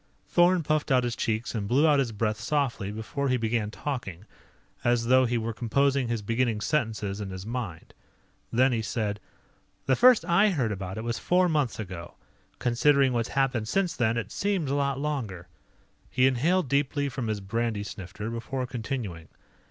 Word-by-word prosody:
Thorn 175 0 +4
puffed 155 -1 0
out 130 -1 +4
his 120 -1 -1
cheeks 110 +1 -2
and 105 -4 -2
blew 140 +8 +4
out 145 -2 +4
his 130 -4 0
breath 110 0 -1
softly 115 -5 -1
before 110 +6 -3
he 130 - +2
began 115 -2 -1
talking, 105 - -5 0.6
as 120 -1 +2
though 130 +2 +5
he 120 0 0
were 115 0 -2
composing 135 +3 +1
his 115 -2 -2
beginning 115 0 0
sentences 110 -6 -1
in 100 - -4
his 95 0 -7
mind. 110 -8 -5 0.6
Then 130 +3 +4
he 115 -2 0
said: 105 -2 -2 0.7
"The 130 - +3
first 245 - +6
I 175 +5 +4
heard 130 - 0
about 95 -1 -5
it 110 - -4
was 115 0 -2
four 180 +1 +3
months 150 -9 0
ago. 90 -4 -7 0.4
Considering 135 +2 +3
what's 115 -1 -1
happened 130 -5 0
since 180 - 0
then, 115 -1 +1
it 110 -2 -3
seems 195 -8 -1
a - - +1
lot 140 -1 0
longer." 115 - -3 0.6
He 130 - +3
inhaled 150 +7 +2
deeply 140 +1 +1
from 130 -3 -4
his 110 -1 -1
brandy 110 +1 -2
snifter 105 +2 -6
before 125 +3 -3
continuing. 115 - -5
120 Hz, 175 wpm, -27 LUFS, 110-140 Hz, 0.7 s, first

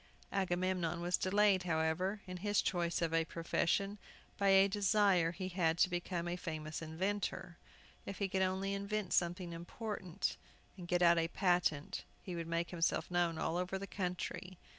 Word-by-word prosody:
Agamemnon 180 -3 0
was 175 +1 +1
delayed, 200 0 +3
however, 175 +4 0
in 185 -1 -6
his 205 +2 +1
choice 170 -2 0
of 165 -1 0
a 165 0 +3
profession, 185 +5 0 0.4
by 200 - +1
a 195 0 +7
desire 200 -3 +3
he 185 +2 -5
had 170 -3 +1
to 180 - +4
become 175 0 -2
a 175 - -1
famous 155 -3 -5
inventor. 180 +2 -3 0.5
If 195 - -5
he 200 - 0
could 190 0 0
only 190 +1 0
invent 200 +1 -2
something 175 0 0
important, 185 +1 -4 0.4
and 180 -3 -9
get 175 0 +2
out 170 0 +6
a 165 - +1
patent, 175 -5 +1 0.2
he 180 - -5
would 165 -1 -4
make 170 +1 -1
himself 175 0 0
known 175 -2 +1
all 165 +1 -1
over 180 +1 -1
the 195 - -5
country. 180 -1 -4
180 Hz, 165 wpm, -35 LUFS, 170-195 Hz, 0.5 s, a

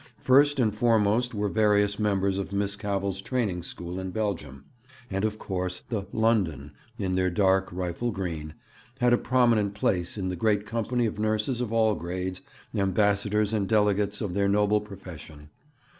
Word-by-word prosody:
First 140 +2 +5
and 110 -4 +2
foremost 115 +2 +2
were 105 0 0
various 105 -1 +2
members 100 -2 +1
of 100 - -4
Miss 100 0 -1
Cavell's 100 -1 -2
training 100 -6 -1
school 85 +1 -6
in 95 0 -4
Belgium; 90 -10 -4 0.5
and, 95 +1 -1
of 110 0 -1
course, 90 -3 -3
the 105 -4 -3
'London,' 95 -11 +1 0.3
in 95 -5 -2
their 90 0 +2
dark 95 +1 +2
rifle 90 +6 -2
green, 85 -7 -4 0.4
had 125 -1 +4
a - - +5
prominent 115 -5 +2
place 90 -2 -1
in 95 -2 -2
the 90 - -2
great 105 +2 +1
company 115 +3 -1
of 105 -1 -3
nurses 110 +3 0
of 120 -3 -3
all 110 -1 +3
grades, 90 +1 -4 0.3
ambassadors 105 +2 +1
and 100 -3 0
delegates 105 -1 +2
of 100 -5 -2
their 100 +1 +1
noble 105 +1 +3
profession. 80 -7 -11
100 Hz, 160 wpm, -27 LUFS, 95-110 Hz, 0.5 s, First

